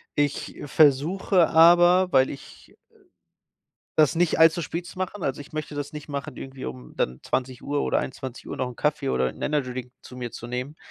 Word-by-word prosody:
Ich 145 -1 -1
versuche 160 +5 +3
aber, 175 +3 +6
weil 130 -2 +4
ich 135 - -12
äh, - - -23 1.2
das 155 -1 +4
nicht 175 -1 +2
all 160 0 +8
zu 165 - -4
spät 170 +2 -4
zu 185 - -11
machen. 185 +1 -4
Also, 135 -1 -2
ich 145 - -12
möchte 155 -1 -4
das 145 +1 -5
nicht 150 0 -8
machen, 140 -1 -5
irgendwie, 135 -1 -8
um 65 -1 -9
dann 65 0 -2
20:00 130 +3 -2
oder - - +1
21:00 130 -1 -7
noch 130 - -1
'n 125 - -10
Kaffee 150 -2 0
oder 65 - +1
'n - - -15
Energydrink 130 -4 -2
zu - - -12
mir 120 -1 -4
zu 115 - -8
nehmen, 125 +5 -5
145 Hz, 195 wpm, -25 LUFS, 130-165 Hz, 1.2 s, all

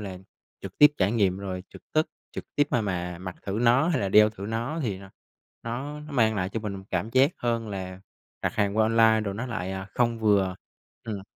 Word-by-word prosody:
là, 95 -3 -6 0.4
trực 95 -1 -9
tiếp 150 -1 +9
trải 95 +2 +2
nghiệm 100 -5 +2
rồi 95 -2 -5
trực - - -14
tức 155 0 +2 0.2
trực - - -6
tiếp 145 - +3
mà 120 - +2
mà 90 -4 -3
mặc 95 0 -7
thử 95 - -4
nó 125 +6 +4
hay 155 -7 +1
là 100 - 0
đeo 105 +2 +6
thử 100 -2 -8
nó 120 +9 -2
thì 105 -7 -2
nó 95 0 -13 0.9
nó 150 0 -10
mang 110 -5 +3
lại 95 -3 -1
cho 110 +3 -4
mình 100 -3 -5
cảm 95 +4 -1
giác 130 +4 +4
hơn 115 -2 -1
là 95 -2 -6 0.4
đặt - - -1
hàng 100 -1 0
qua 110 - +5
online 110 0 +4
rồi 100 -2 -3
nó 115 +5 -4
lại, 100 -6 -3
à, 95 0 -5
không 120 -1 +1
vừa. 100 -4 +2 0.5
Ừm. 105 -4 -5
105 Hz, 220 wpm, -26 LUFS, 95-115 Hz, 0.9 s, tiếp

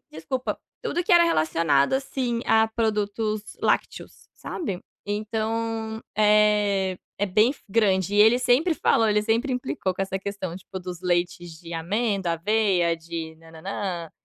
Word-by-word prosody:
Desculpa, 165 +12 -4 0.2
tudo 410 -7 -1
que 365 - +1
era 345 0 +7
relacionado, 155 - +2
assim, 260 -3 -2
a 220 0 +4
produtos 215 -1 -1 0.2
lácteos, - - -2
sabe. 195 - -5 0.3
Então, 220 +1 -2 0.2
eh, 210 -3 +3 0.2
é 205 - +1
bem 215 +8 +3
grande 195 -2 +2
e 205 - +5
ele 225 +3 +6
sempre 255 +8 +3
falou 225 -6 +2
ele 210 0 +2
sempre 230 +5 0
implicou 250 -7 -2
com 195 - -2
essa 190 0 -3
questão, 195 -3 -5
tipo, 190 +1 -8
dos 180 -1 -7
leites 175 -1 -1
de 170 0 -10
amêndoa, 195 +2 -1
aveia, 180 -1 +1
de 165 -1 -6
nã-nã-nã, 165 +1 -5
205 Hz, 140 wpm, -25 LUFS, 175-225 Hz, 0.3 s, era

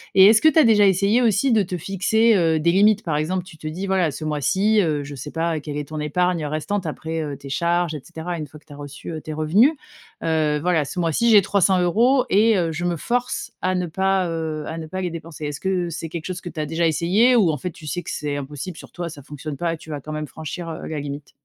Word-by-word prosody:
et 190 - +9
est 215 - +8
ce 220 - +4
que - - +5
tu 320 - +3
as - - +7
déjà 210 -3 +5
essayé 200 +5 +3
aussi, 230 +3 +2
de 215 -2 +4
te 180 0 -4
fixer, 205 +6 +2
heu, 165 -4 +2
des 170 +2 +3
limites? 210 +3 +4
Par 160 -3 -1
exemple 175 +4 -1
tu 180 -3 -14
te 155 - -7
dis, 180 +6 -4
voilà 185 -4 +1
ce 140 - -7
mois-ci, 190 +8 +2
heu, 155 -5 0
je 145 0 -8
sais 145 +2 -7
pas 165 -1 -1
quelle 150 -1 -6
est 145 -1 -4
ton 155 -1 -5
épargne, 170 +3 0
heu, 150 - -2
restante 165 +6 -2
après, 160 +1 -4
heu, 145 -2 -4
tes 140 - -10
charges 170 +2 0
et 145 - -6
cetera. 175 +2 -6
Une 155 -2 -5
fois 150 +2 -14
que - - -32
tu 145 - -13
as - - -11
reçu, 145 +2 -8
heu, 160 -1 -5
tes 155 - -6
revenus, 170 - +4 0.5
heu, 155 -2 +1
voilà. 170 -2 +2
Ce 175 - -8
mois 165 -2 +1
ci 235 +9 +2
j'ai 210 -2 +8
300€ 200 +7 +3
et 215 +2 +4
heu, 170 -3 0
je 160 +3 -4
me 175 -1 0
force 245 +8 -2
à 185 0 0
ne 180 -1 0
pas, 190 +2 +1
heu, 160 -2 -3
à 160 - -5
ne 160 -1 -6
pas 185 +3 -4
les 180 - -1
dépenser. 165 -2 -8
Est-ce 145 0 -4
que 185 -2 0
c'est 165 0 -5
quelque 165 0 -6
chose 180 -1 -5
que 175 - -7
tu 165 - -8
as 150 - -1
déjà 165 +3 0
essayé, 195 +10 +3
ou 195 -7 +4
en 150 - -2
fait, 180 +6 -5
tu 155 0 -12
sais 175 +4 -3
que - - -6
c'est 145 -1 -3
impossible 145 +5 -6
sur - - -12
toi, 175 -1 -5
ça 145 -3 -11
fonctionne 150 +1 -7
pas 170 +1 -1
et - - -5
tu 160 - -15
vas 145 -2 -5
quand 155 - -8
même 155 0 -4
franchir, 160 +5 -7
heu, 160 - -6
la 155 -2 -4
limite? 140 0 -7
170 Hz, 285 wpm, -22 LUFS, 155-190 Hz, 0.5 s, et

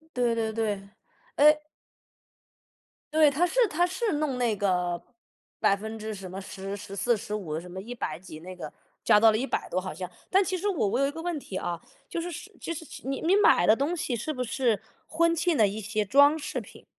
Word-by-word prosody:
对 245 -2 +2
对 225 -1 -1
对， 210 -3 -2 0.5
哎。 300 +1 +5 1.5
对， 310 -1 +6
他 310 +6 +2
是 485 +6 +3
他 350 +1 +2
是 380 +5 -1
弄 295 -3 -1
那 240 -3 +1
个 180 -3 0 0.6
百 - - +4
分 220 +2 -6
之 215 0 -5
什 190 -2 -8
么， 190 +2 -6
10、 195 +1 -6
14、 200 +4 -1
15， 200 -7 -4
什 175 +2 -9
么 185 +2 -6
100 235 -1 -5
几 170 -3 -11
那 185 +3 -8
个 180 - -7 0.3
加 210 - +6
到 225 +1 +7
了 215 - +1
100 265 +4 -2
多 185 - 0
好 185 -3 -6
像， 180 +2 -6 0.2
但 385 +1 +5
其 370 0 -1
实 405 +4 -1
我 360 - +1
我 230 +5 0
有 275 - +4
一 - - -1
个 325 +3 -7
问 345 -2 -2
题 200 -8 -8
啊， 175 -2 -3 0.3
就 335 - -3
是 350 +1 -4 0.3
就 335 - -3
是， 320 - -7 0.2
你 270 - -2
你 345 +4 +4
买 420 +3 +5
的 215 - +7
东 285 +8 -1
西 285 -6 -2
是 235 +7 -2
不 255 -3 -3
是 230 -3 0 0.2
婚 335 +1 +2
庆 335 0 +1
的 220 -5 +5
一 205 +2 -3
些 215 +1 -1
装 285 +8 +5
饰 295 - -4
品？ - - -14
230 Hz, 210 characters per minute, -27 LUFS, 195-310 Hz, 1.5 s, 到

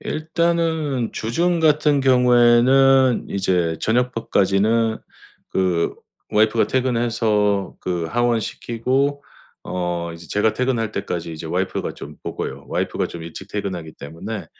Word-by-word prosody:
일단은 160 -5 -1
주중 170 +10 0
같은 150 -2 +3
경우에는 125 +1 +4
이제 90 -4 0
저녁밥까지는 110 -2 +1 0.5
그 90 -3 0 0.4
와이프가 110 +2 +3
퇴근해서 115 -6 +1
그 90 -2 -2
하원 120 +4 +1
시키고 135 +7 -1 0.4
어 85 -2 -3
이제 85 -1 -13
제가 105 +2 +1
퇴근할 120 -4 -1
때까지 85 -2 -4
이제 80 +1 -7
와이프가 95 +3 -2
좀 75 +1 -10
보고요. - - -5
와이프가 - - -1
좀 85 - -8
일찍 85 +4 -9
퇴근하기 95 -6 -4
때문에. 85 +6 -7
115 Hz, 285 characters per minute, -21 LUFS, 90-130 Hz, 0.5 s, 경우에는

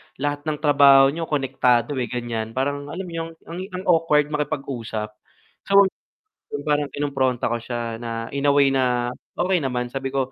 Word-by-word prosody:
lahat 145 +2 -3
ng 150 -1 -1
trabaho 140 -2 +6
niyo 165 +2 -4
konektado, 130 -2 +1
eh, 125 - -1
ganyan, 115 -2 -4
parang 145 +2 -1
alam 175 +6 -5
mo 180 - -9
yung 165 0 -4
ang 170 +2 -7 0.2
ang 185 - -5
awkward 160 -4 +3
makipag-usap. 135 -8 -3 0.6
So 195 - +2 0.8
'yun - - -5
parang 145 -1 +1
kinumpronta 135 -5 0
ko 120 - -1
siya 115 -1 -4
na 115 -1 -5
in 140 +1 -1
a - - +6
way 140 -1 +5
na 125 -2 +1 0.3
okey 180 0 +2
naman 125 -2 -1
sabi 135 0 -4
ko, 135 -1 -1
135 Hz, 175 wpm, -23 LUFS, 125-150 Hz, 0.8 s, trabaho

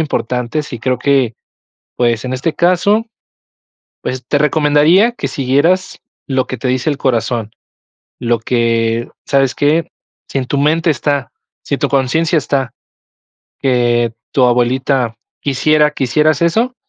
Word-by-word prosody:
importantes 130 0 -2
y 120 - -4
creo 125 +1 -1
que, 130 -4 +1 0.6
pues, 120 -1 0
en 130 - -3
este 140 +5 -1
caso, 190 +6 +2 1.0
pues, 130 0 -4
te 145 - +1
recomendaría 150 - +3
que 190 -12 -4
siguieras 145 +8 0 0.3
lo 130 -2 0
que 130 - -5
te 125 - -3
dice 130 +3 0
el 145 - -1
corazón, 115 -4 -1 0.7
lo 120 -1 0
que 115 0 0 0.2
¿sabes 135 -2 +1
qué? 150 +3 +1 0.4
Si - - -3
en 130 - -1
tu 140 - -2
mente 160 +4 +2
está, 140 -2 -1 0.3
si - - -1
en - - -11
tu - - 0
conciencia 155 +5 +1
está, 135 -3 -1 0.9
que 120 -3 +1 0.2
tu 130 - +3
abuelita 125 0 +1 0.3
quisiera 150 +2 +2
que 140 -2 -3
hicieras 150 +5 +2
eso, 225 +9 +1
135 Hz, 140 wpm, -15 LUFS, 125-150 Hz, 1.0 s, recomendaría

